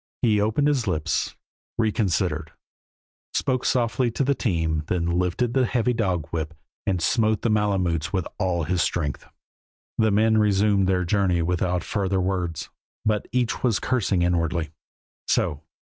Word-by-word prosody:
He 105 -3 +3
opened 110 +8 +2
his 135 -7 +1
lips, 80 -3 -1 0.4
reconsidered, 95 -8 0 0.8
spoke 130 -2 0
softly 120 0 +1
to 115 - -1
the 140 +1 +2
team, 80 - 0
then 90 -2 0
lifted 90 +7 0
the 130 -2 +3
heavy 125 +1 +1
dog 95 -9 0
whip 80 -1 -3 0.3
and 95 -3 +1
smote 110 +5 +1
the 115 - +2
Malemutes 95 -6 +1
with 95 -4 -1
all 90 -4 0
his 85 +3 0
strength. 75 -6 -2 0.7
The 110 -1 +4
men 110 +2 +3
resumed 100 -2 +3
their 90 -1 +1
journey 90 -2 +1
without 90 +1 0
further 95 -2 -1
words, 90 -4 -2 0.3
but 105 -1 0
each 125 -1 0
was 120 -5 +2
cursing 100 -8 +1
inwardly. 85 -2 0 0.6
"So! 75 0 0
95 Hz, 145 wpm, -24 LUFS, 85-110 Hz, 0.8 s, The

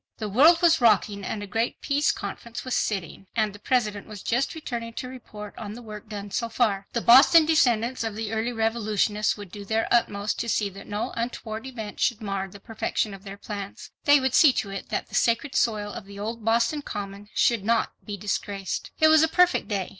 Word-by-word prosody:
The 215 - -4
world 310 - +5
was 335 -4 +5
rocking 210 -3 +3
and 205 +2 -4
a - - -4
great 225 +4 -2
peace 290 +1 +1
conference 230 +4 -7
was 255 - -3
sitting, 195 -2 -2
and 215 -3 +1
the 205 - -12
President 210 -4 0
was 210 -2 -9
just 245 +7 0
returning 235 -7 -5
to 255 - -5
report 215 -5 -9
on 210 -2 -6
the 240 - -9
work 215 -1 -10
done 205 -1 -6
so 230 +4 -2
far. 205 -4 0
The 235 - 0
Boston 275 +8 +7
descendants 250 -6 +2
of 225 -2 -3
the 220 0 -4
early 225 +2 -1
revolutionists 215 -2 0
would 205 -3 -10
do 205 0 -8
their 220 +2 0
utmost 210 -3 +1
to 235 - -2
see 210 -2 +1
that 195 +1 -12
no 210 +1 -3
untoward 230 0 -4
event 220 -5 -7
should 235 -3 +1
mar 195 -3 -3
the 200 +1 -13
perfection 215 -1 -2
of 195 0 -11
their 200 -1 -8
plans. 200 -1 -7
They 290 0 +7
would 265 -2 0
see 305 - +7
to 200 - -2
it 195 - -6
that - - -3
the - - -19
sacred 235 +4 +1
soil 210 -3 0
of 220 - -8
the 200 0 -11
old 220 +2 -5
Boston 235 +6 +1
Common 205 -4 -7
should 230 -4 +2
not 230 +2 +1
be 205 -1 -6
disgraced. 195 -1 -3
It 315 - +6
was 315 -1 +6
a 320 - +5
perfect 360 +2 +3
day. 200 -4 -2
220 Hz, 215 wpm, -25 LUFS, 205-240 Hz, -, Boston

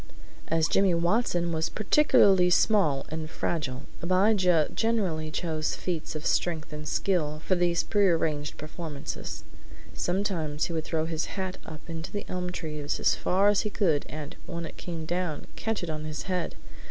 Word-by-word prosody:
As 160 0 +2
Jimmy 195 -3 +3
Watson 175 -1 +1
was 160 -1 0
particularly 195 -6 +5
small 175 -8 +3
and 160 0 -4
fragile, 140 -7 -2 0.2
Abijah 185 -3 +4
generally 190 -9 0
chose 155 -1 -1
feats 165 -3 -3
of 155 - -5
strength 160 -3 0
and 150 0 -6
skill 155 -4 0
for - - +2
these 175 -1 +2
prearranged 165 -7 +1
performances. 155 -1 -6 0.5
Sometimes 175 -5 -1
he 170 - -4
would 160 -1 -2
throw 160 -1 0
his 160 -1 -2
hat 190 -1 -3
up 155 -1 -9
into 165 0 -5
the 205 - -4
elm 180 0 -3
trees 150 -4 -3
as - - +4
far 195 +3 +2
as 205 - +3
he 210 - -2
could 165 -9 +1
and, 150 -1 -6
when 170 0 -4
it - - -8
came 165 -3 -5
down, 175 -2 -2
catch 220 -4 -2
it 170 - -3
on 155 0 -4
his 155 -1 -4
head. 180 -2 -2
170 Hz, 165 wpm, -28 LUFS, 155-185 Hz, 0.5 s, particularly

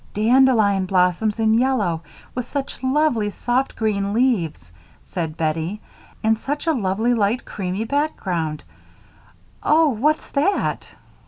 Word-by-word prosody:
"Dandelion 215 -4 +4
blossoms 185 +3 +2
in 220 -1 +2
yellow, 225 -9 +1 0.3
with 250 -1 -4
such 280 -1 -4
lovely 260 -5 +1
soft 245 +5 -1
green 200 -2 -1
leaves," 180 - 0 0.3
said 165 -3 -4
Bettie, 160 +5 -2 0.4
"and 220 0 +2
such 290 +6 -3
a 325 - +2
lovely, 220 0 0
light, 225 +2 0
creamy 190 +1 -3
background. 185 - -2 1.0
Oh! 315 0 +4
what's 290 +6 0
that?" 305 +8 -1
220 Hz, 115 wpm, -21 LUFS, 190-260 Hz, 1.0 s, Dandelion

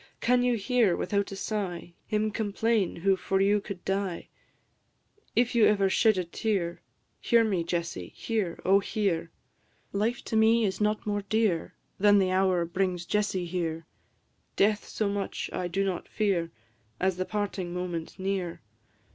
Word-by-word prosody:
Can 250 +1 +3
you 245 -1 +2
hear, 220 -3 +2
without 200 -1 -1
a - - -5
sigh, 185 -5 -4
Him 215 0 0
complain 215 -1 0
who 195 +3 +2
for 190 +1 -1
you 200 +1 +3
could 195 -3 -8
die? 195 -2 -2 1.1
If 240 +1 +2
you 235 -3 +5
ever 200 -2 +3
shed 220 -1 +4
a 185 - +1
tear, 175 -2 -2 0.4
Hear 235 -1 +4
me, 195 -6 0
Jessie, 170 - -3
hear, 210 -7 -2
O 195 +2 +6
hear! 190 -5 -1 0.6
Life 215 +4 0
to - - -3
me 220 +1 +5
is 195 +1 -2
not 210 +2 +1
more 205 -1 -1
dear 205 -4 0 0.2
Than 205 +1 +6
the 190 -2 +2
hour 185 -2 +2
brings 180 0 -1
Jessie 200 -2 0
here; 165 -2 -3 0.7
Death 210 +1 +2
so 215 - -1
much 200 0 -3
I 180 - -2
do 195 +3 0
not 185 -3 -3
fear 190 -6 0 0.5
As 185 -1 +1
the 185 - -1
parting 200 -4 -3
moment 175 -2 -4
near. 190 -3 -3
195 Hz, 155 wpm, -28 LUFS, 180-210 Hz, 1.1 s, O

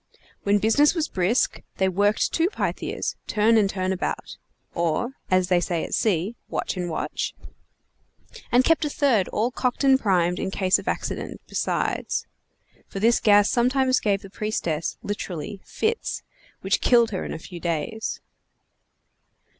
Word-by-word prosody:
When 205 +1 +3
business 225 - +4
was 325 -2 0
brisk 190 +7 +1 0.2
they 190 - +2
worked 205 +3 +1
two 335 +2 +2
Pythias, - - -3
turn 220 +2 +3
and 210 -3 +4
turn 185 -1 -1
about 185 - -4 0.4
(or, 170 +8 0 0.2
as 185 -1 +2
they 180 -1 +4
say 175 -1 -1
at - - -6
sea, 200 +1 +1
watch - - -2
and 180 -1 -3
watch), 160 - -3 1.2
and 245 +1 +5
kept 330 +3 +3
a 300 - 0
third 255 -10 +2
all 230 +4 0
cocked 250 +1 -1
and 265 -1 +5
primed 180 -6 +1
in - - -2
case 190 -1 +2
of - - -11
accident, - - -3
besides; - - -1 0.6
for 195 - -6
this 230 +3 +4
gas 205 -1 +5
sometimes 255 +1 +2
gave 200 -2 0
the 195 - -11
priestess 175 -8 -2
(literally) 190 -2 -5
fits, 450 +1 -2 0.4
which - - +1
killed 235 -2 +4
her 190 - -3
in - - -5
a - - -4
few 175 +2 -9
days. 170 +7 -3
205 Hz, 155 wpm, -24 LUFS, 185-240 Hz, 1.2 s, and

